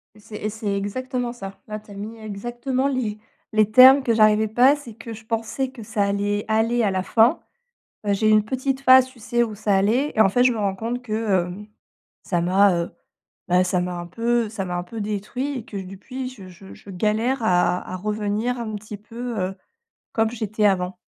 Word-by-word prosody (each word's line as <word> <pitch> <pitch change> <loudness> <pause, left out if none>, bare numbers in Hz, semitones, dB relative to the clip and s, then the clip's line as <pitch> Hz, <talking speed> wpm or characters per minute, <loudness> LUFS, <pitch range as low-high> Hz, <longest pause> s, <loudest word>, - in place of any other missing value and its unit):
Et - - -17
c'est 210 +1 -12
et 215 - -3
c'est 210 -2 -3
exactement 245 +4 -3
ça. 195 -5 -8
Là, 215 0 -5
tu 210 -1 -17
as - - -9
mis 215 +3 -7
exactement 240 +5 -3
les 240 -6 -2 0.4
les 215 -1 +3
termes 260 +4 +8
que 235 - +2
j'arrivais 215 0 +4
pas, 250 +6 +5
c'est 240 -6 -11
que 230 +1 -10
je 220 0 -12
pensais 230 +4 -2
que 235 -5 -10
ça 210 -1 -1
allait 205 +1 -1
aller, 225 +2 +2
à 200 - +2
la 185 0 -1
fin. 230 - +3 0.6
Heu, 200 - +2
j'ai 215 +2 +1
eu - - +5
une 215 -1 +5
petite 265 +3 -2
phase, 260 -1 +7
tu 255 -2 -19
sais, 240 +2 +1
où 215 -2 -4
ça 205 -1 +1
allait 230 +9 +2
et - - -1
en 200 - +6
fait, 245 +5 +3
je 255 - +5
me 230 - -3
rends 200 -2 -1
compte 235 +5 -4
que, 220 -4 -6 0.3
hem, 200 +4 -9 0.6
ça 175 -3 -1
m'a, 190 +3 +4
heu, 170 0 -2 0.6
bah, 180 +1 +4
ça 180 0 0
m'a 180 0 -3
un 175 - -7
peu 235 +3 0
ça 205 -3 -4
m'a 180 - -4
un 175 - -3
peu 220 +5 -8
détruit 225 +7 -3
et 225 - -11
que, 205 - -7
depuis, 205 +8 -6
je 205 -7 -12
je 190 +2 -13
je - - -15
galère 215 +7 0
à 180 -2 +3
à - - -3
revenir 210 +4 -2
un 220 -2 -4
petit 210 0 -8
peu, 230 +2 -6
heu, 185 +1 -2 0.6
comme 225 -1 +1
j'étais 215 -2 -2
avant. 185 -2 +1
215 Hz, 220 wpm, -23 LUFS, 200-240 Hz, 0.6 s, termes